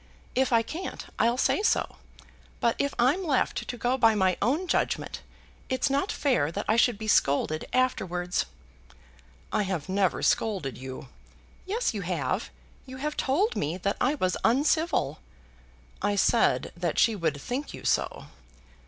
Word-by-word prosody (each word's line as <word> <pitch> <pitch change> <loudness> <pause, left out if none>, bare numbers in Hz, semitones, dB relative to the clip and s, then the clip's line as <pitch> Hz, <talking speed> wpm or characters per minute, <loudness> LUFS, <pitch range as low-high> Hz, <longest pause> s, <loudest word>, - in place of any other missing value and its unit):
If 265 0 +1
I 230 -1 +4
can't 340 +10 -6
I'll 235 +2 +3
say 360 - +2
so. 435 - +1 0.6
But 235 - +2
if 280 0 0
I'm 270 +11 +3
left 285 -7 0
to 245 - -4
go 250 +2 0
by 225 -2 +5
my 190 -3 +2
own 285 - +1
judgement, - - -1 0.5
it's 260 +2 +1
not 285 +9 +1
fair 245 - +1
that 205 - -3
I 215 - +3
should 235 -1 +3
be 215 +1 -6
scolded 155 -4 +2
afterwards." 180 -9 0 1.1
"I - - +2
have 185 -4 -3
never 190 -1 +1
scolded 190 - +1
you." 130 0 -8 0.6
"Yes, 455 +6 0
you - - -3
have. - - -2 0.4
You 260 0 -8
have 300 +3 -3
told 370 - +1
me 155 +5 -1
that 200 +2 -1
I 275 +4 +2
was 185 -10 0
uncivil." 285 - +2 0.8
"I 205 - +1
said 225 +3 +2
that 170 -2 -2
she 225 -2 +4
would 160 -6 -1
think 255 - -4
you - - -9
so." - - 0
230 Hz, 155 wpm, -27 LUFS, 185-275 Hz, 1.1 s, by